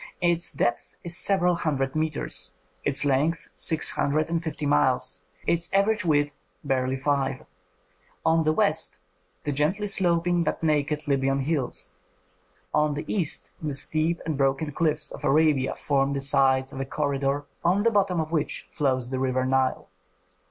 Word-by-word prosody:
Its 170 -1 +1
depth 120 -5 -2
is 170 0 -1
several 180 -2 +3
hundred 140 -5 -1
metres, 145 -12 -2 0.3
its 140 +1 +2
length 145 +4 0
six 160 -1 +2
hundred 155 +3 0
and 165 -1 0
fifty 155 -3 -4
miles, 130 -7 +2 0.2
its 170 +1 +1
average 210 +2 +2
width 145 -3 0 0.2
barely 130 -2 0
five. 140 0 -1 0.8
On 160 0 +4
the 155 - +2
west 155 -9 +1 0.5
the 145 - -2
gently 155 +9 0
sloping 175 -3 +2
but - - -3
naked 150 0 0
Libyan 135 -1 +1
hills, 140 -2 -2 0.8
on 150 -1 +2
the 145 - -5
east 180 -7 0
the 150 -2 -2
steep 155 +4 +1
and 155 -3 -2
broken 135 +3 +1
cliffs 155 -1 0
of - - -10
Arabia 145 -2 +2
form 140 -1 0
the 140 - -1
sides 135 0 +2
of 135 - -6
a 135 - -2
corridor 140 0 -1 0.2
on 185 +4 +2
the 230 - +3
bottom 195 -4 +1
of 160 0 -3
which 155 -3 -2
flows 130 -4 0
the 130 - -2
river 130 -1 0
Nile. 130 0 0
150 Hz, 155 wpm, -25 LUFS, 135-165 Hz, 0.8 s, On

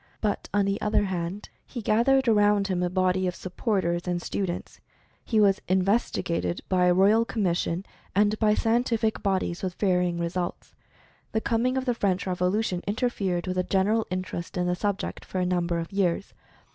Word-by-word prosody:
But 210 -2 -2
on 205 -1 +2
the 200 +1 -1
other 210 0 +2
hand, 185 +1 -4
he 250 - -7
gathered 240 +5 +3
around 205 -2 +3
him 180 -1 0
a 180 - +1
body 185 0 +1
of 180 - -2
supporters 185 -3 -1
and 175 -1 0
stu 195 +2 -2
dents. 175 - -6 0.4
He 220 - +1
was 200 -2 +4
"investigated" 185 - 0
by 180 -1 +2
a 180 - +4
Ro^al 205 +5 +5
Commis 185 -6 0
sion, 175 +3 -2 0.3
and 210 +1 +3
by 215 -1 +3
scientific 230 -1 +1
bodies, 190 -3 -1
with 185 -2 -3
varying 180 -3 +1
results. 175 +1 -3 0.6
The 220 - +1
coming 240 +4 +1
of 260 - -1
the 245 - +2
French 200 -4 0
Revolution 180 +1 0
interfered 200 -5 -1
with 185 -1 -3
the 180 - +2
general 205 +4 +1
interest 185 -1 -4
in 180 - +1
the 180 - +1
subject 200 +2 -3
for 185 - -4
a 180 - +1
number 175 -1 0
of 165 0 -4
years. 195 -1 0
190 Hz, 180 wpm, -26 LUFS, 180-215 Hz, 0.6 s, Ro^al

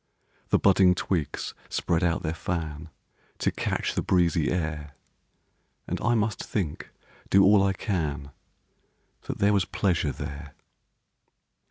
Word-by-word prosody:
The - - +4
budding 95 -2 +5
twigs 85 -6 -2 0.2
spread 85 0 0
out 85 -1 +1
their 80 -1 -1
fan 80 -2 -4 0.5
To - - 0
catch - - -2
the - - 0
breezy 85 -3 +2
air; 75 -4 -3 0.9
And - - -4
I 120 +2 +2
must 110 -1 -1
think, 90 -9 -3 0.4
do 100 0 +6
all 100 0 +6
I 100 0 +2
can, 75 - -3 1.0
That - - -3
there 100 +1 +3
was 100 -3 +2
pleasure 85 -7 0
there. 70 +2 -7
85 Hz, 130 wpm, -26 LUFS, 75-95 Hz, 1.0 s, do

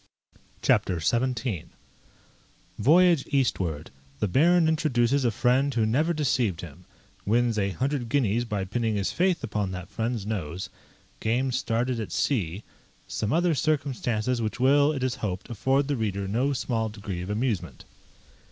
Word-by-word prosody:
CHAPTER 90 -3 +2
XVII 120 - -1 1.2
_Voyage 170 - +5
eastward 95 - -1 0.3
The 105 - +1
Baron 165 - +4
introduces 140 -5 +2
a 120 - +3
friend 130 +5 +2
who 115 -4 +1
never 145 +10 +1
deceived 125 - 0
him: 85 +1 -11 0.4
wins 115 +1 +1
a 100 -1 +1
hundred 130 +3 -2
guineas 120 -4 +1
by 105 -5 -3
pinning 110 +2 -1
his 100 -2 -1
faith 180 +2 +1
upon 105 -2 -2
that 90 -1 -7
friend's 115 -2 -2
nose 95 -4 -4 0.5
Game 125 +4 0
started 125 0 -1
at 110 - -5
sea 100 - -1 0.4
Some 105 - -2
other 170 +1 +2
circumstances 125 -5 0
which 110 +3 -3
will, 140 +3 +4
it 135 -4 -3
is 130 -1 -1
hoped, 100 +2 -4
afford 135 +5 +1
the 145 - 0
reader 100 -4 -2
no 125 +8 +1
small 115 -4 -1
degree 100 -4 -6
of 90 - -6
amusement. 105 - -2
120 Hz, 145 wpm, -26 LUFS, 105-135 Hz, 1.2 s, Voyage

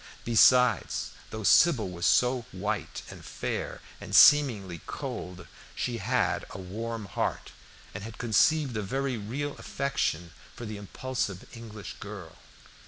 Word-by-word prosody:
Besides, 120 0 +4 0.2
though 110 0 -6
Sybil 125 - +5
was 85 -1 -2
so 125 +7 +3
white - - -4
and - - -11
fair, - - -4 0.2
and - - -4
seemingly 110 - +6
cold, 90 -2 -6 0.3
she 120 -2 -2
had 125 +5 0
a - - -8
warm 110 +4 -5
heart, 100 - -3 0.4
and 95 - -6
had 115 +1 -8
conceived 125 +4 +2
a 105 - -1
very 135 +6 -2
real 135 +8 -4
affection 135 -11 -2 0.2
for 120 - -7
the 105 -1 -6
impulsive 105 -2 -4
English 110 -3 -9
girl. 100 -5 -9
110 Hz, 130 wpm, -28 LUFS, 100-125 Hz, 0.4 s, seemingly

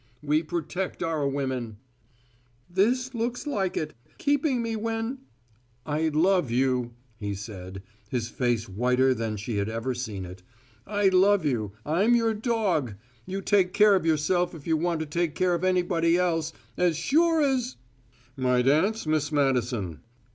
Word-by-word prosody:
We 150 +1 +2
protect 175 +3 -3
our 160 -4 0
women 130 -6 -3 0.5
" 120 0 -37
"This 255 +3 0
looks 240 +3 -2
like 200 -11 -1
it! 155 -1 -3 0.2
Keeping 285 -3 +1
me 230 -1 -2
when 225 +4 -3 0.3
" 120 +2 -37
"I 160 - +2
love 170 0 +2
you," 125 -1 0 0.2
he 100 -2 -4
said, 95 -2 -8 0.3
his 120 -4 -2
face 120 -3 -1
whiter 125 +6 +2
than 110 -3 -3
she 105 +1 -4
had 100 +1 -1
ever 115 +3 -2
seen 110 -6 -5
it. 90 +1 -10 0.5
"I 205 -1 +2
love 190 -1 +4
you! 110 -8 -1
I'm 195 +10 +3
your 230 -1 +2
dog! 210 - 0 0.3
You 195 +1 -3
take 190 -3 +2
care 210 0 +6
of 190 - +2
yourself 165 +3 +1
if 150 - -11
you 160 - +2
want 165 0 0
to - - -2
take 165 +1 -1
care 185 -1 +2
of 170 +1 -1
anybody 175 -2 +2
else! 165 -3 0 0.3
As 175 -3 +2
sure 325 - +3
as 260 -3 0 0.3
" 115 - -34 0.2
"My 125 -1 +2
dance, 165 - +2
Miss 155 -1 0
Madison." 125 - 0
155 Hz, 160 wpm, -26 LUFS, 125-195 Hz, 0.5 s, care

